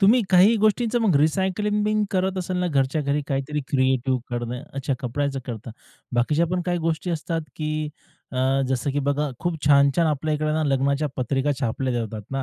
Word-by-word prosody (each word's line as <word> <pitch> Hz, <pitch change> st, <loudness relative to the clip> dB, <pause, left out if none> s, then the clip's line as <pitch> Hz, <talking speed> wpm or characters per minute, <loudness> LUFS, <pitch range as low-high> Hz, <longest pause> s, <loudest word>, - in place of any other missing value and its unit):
तुम्ही 215 Hz, +5 st, +6 dB
काही 190 Hz, +5 st, +6 dB
गोष्टींचं 215 Hz, +3 st, +2 dB
मग 215 Hz, -7 st, +3 dB
रिसायकलिंग 190 Hz, +7 st, +1 dB
बिन 215 Hz, 0 st, +2 dB
करत 190 Hz, 0 st, 0 dB
असाल 185 Hz, 0 st, -3 dB
ना, 180 Hz, 0 st, 0 dB
घरच्या 140 Hz, -1 st, +1 dB
घरी 140 Hz, +1 st, 0 dB
काहीतरी 140 Hz, +1 st, -1 dB
क्रिएटिव्ह 130 Hz, -1 st, +1 dB
करणं 120 Hz, +1 st, -3 dB
अच्छा, 135 Hz, 0 st, -2 dB
कपड्याचं 135 Hz, +2 st, -2 dB
करता. 115 Hz, -2 st, -6 dB, 0.4 s
बाकीच्या 150 Hz, +8 st, +2 dB
पण 180 Hz, +2 st, -1 dB
काही 175 Hz, -1 st, +1 dB
गोष्टी 165 Hz, +2 st, -1 dB
असतात, 165 Hz, 0 st, -2 dB, 0.2 s
की 155 Hz, 0 st, -2 dB, 0.4 s
अ, 130 Hz, +1 st, +1 dB
जसं 130 Hz, +2 st, -1 dB
की 140 Hz, -, -1 dB
बघा 145 Hz, +1 st, +1 dB
खूप 175 Hz, -1 st, -1 dB
छान-छान 140 Hz, +3 st, +5 dB
आपल्या 155 Hz, 0 st, 0 dB
इकडे 155 Hz, 0 st, -1 dB
ना, 155 Hz, 0 st, +1 dB
लग्नाच्या 140 Hz, +1 st, +1 dB
पत्रिका 135 Hz, +3 st, 0 dB
छापल्या 130 Hz, +1 st, -1 dB
जातात 115 Hz, -2 st, -3 dB
ना. 135 Hz, 0 st, -2 dB
150 Hz, 180 wpm, -24 LUFS, 135-175 Hz, 0.4 s, तुम्ही